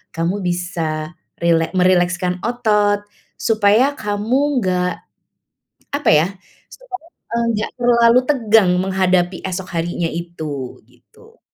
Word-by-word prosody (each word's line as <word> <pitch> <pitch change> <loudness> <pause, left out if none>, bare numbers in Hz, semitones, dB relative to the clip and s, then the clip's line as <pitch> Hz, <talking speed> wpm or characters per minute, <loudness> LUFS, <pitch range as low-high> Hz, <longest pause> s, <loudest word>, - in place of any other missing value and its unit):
kamu 170 +5 -1
bisa 170 -2 -3 0.3
rilek 165 -1 +2
merilekskan 180 0 +2
otot. 210 -4 +1 0.4
Supaya 225 +5 +3
kamu 245 +7 0
nggak, 180 -2 0 1.1
apa 290 - +1
ya, 155 +3 +4 0.4
Supaya 375 -10 -10 0.4
enggak 220 -2 -1
terlalu 235 0 +5
tegang 225 -8 +4
menghadapi 185 -1 +1
esok 185 -1 -4
harinya 170 0 -1
itu, 155 -6 -6
begitu. 460 +1 -23
190 Hz, 100 wpm, -19 LUFS, 175-230 Hz, 1.1 s, terlalu